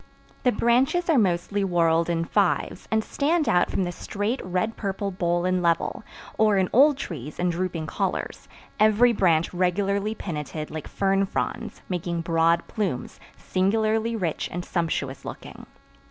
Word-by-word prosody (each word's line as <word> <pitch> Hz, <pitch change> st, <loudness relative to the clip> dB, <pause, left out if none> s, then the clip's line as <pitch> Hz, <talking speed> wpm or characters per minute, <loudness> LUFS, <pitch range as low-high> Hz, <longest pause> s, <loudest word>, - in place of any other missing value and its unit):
The 250 Hz, -, +3 dB
branches 260 Hz, +11 st, +2 dB
are 290 Hz, -, +4 dB
mostly 190 Hz, 0 st, 0 dB
whorled 170 Hz, -2 st, +2 dB
in 165 Hz, -1 st, 0 dB
fives, -, -, 0 dB
and 220 Hz, 0 st, +1 dB
stand 305 Hz, +5 st, 0 dB
out 175 Hz, 0 st, +3 dB
from 190 Hz, -, 0 dB
the 175 Hz, -, -2 dB
straight, 205 Hz, +7 st, -3 dB
red 185 Hz, +5 st, -1 dB
purple 200 Hz, -1 st, -3 dB
bole 175 Hz, -1 st, 0 dB
in 185 Hz, 0 st, +1 dB
level, 170 Hz, +4 st, 0 dB, 0.4 s
or 215 Hz, -2 st, +4 dB
in 185 Hz, -1 st, +1 dB
old 280 Hz, +3 st, +6 dB
trees 150 Hz, -, -6 dB
in 180 Hz, 0 st, +1 dB
drooping 170 Hz, -2 st, -3 dB
collars, -, -, -3 dB, 0.3 s
every 215 Hz, +3 st, +5 dB
branch 170 Hz, -6 st, +2 dB
regularly 200 Hz, +4 st, 0 dB
pinnated 155 Hz, -4 st, -5 dB
like 155 Hz, -1 st, -6 dB
fern 195 Hz, 0 st, +1 dB
fronds, -, -, -4 dB
making 170 Hz, -2 st, -2 dB
broad 165 Hz, 0 st, +2 dB
plumes, 190 Hz, -, -3 dB, 0.2 s
singularly 220 Hz, +4 st, 0 dB
rich 175 Hz, -8 st, -2 dB
and 175 Hz, +1 st, -4 dB
sumptuous 155 Hz, -6 st, -2 dB
looking. -, -, -9 dB
185 Hz, 150 wpm, -25 LUFS, 170-215 Hz, 0.4 s, old